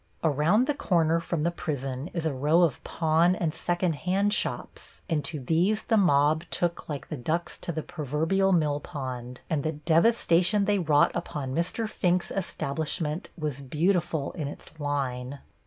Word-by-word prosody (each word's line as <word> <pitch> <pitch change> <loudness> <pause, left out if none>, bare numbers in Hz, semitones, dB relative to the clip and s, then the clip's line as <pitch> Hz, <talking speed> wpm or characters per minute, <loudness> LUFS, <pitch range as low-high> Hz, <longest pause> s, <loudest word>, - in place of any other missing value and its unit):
Around 160 - +3
the 295 - +1
corner 165 - +2
from 165 -2 -2
the 170 - +2
prison 135 -4 -3
is 170 -2 -3
a 155 - 0
row 150 +6 +3
of 160 -7 0
pawn 165 +2 +2
and 170 -6 -1
second 175 +1 0
hand 195 +5 +1
shops, - - -4
and 155 -4 0
to 155 - -4
these 175 - +1
the 225 - +1
mob 155 -5 +4
took 175 -1 -1
like 145 -2 -5
the 155 - -3
ducks 160 +7 -2
to - - -4
the 155 -1 -4
proverbial 160 +6 0
mill 150 -5 +2
pond, 125 -6 -6
and 155 -3 0
the 155 +2 -1
devastation 175 +4 +3
they 205 -1 +2
wrought 155 -4 +4
upon 150 -6 -4
Mr. 170 - -1
Fink's 180 -4 0
establishment 160 -2 -2
was 150 -4 -3
beautiful 160 +1 0
in 155 -5 -4
its 155 +2 -10
line. 140 -2 -2
160 Hz, 165 wpm, -27 LUFS, 145-175 Hz, -, mob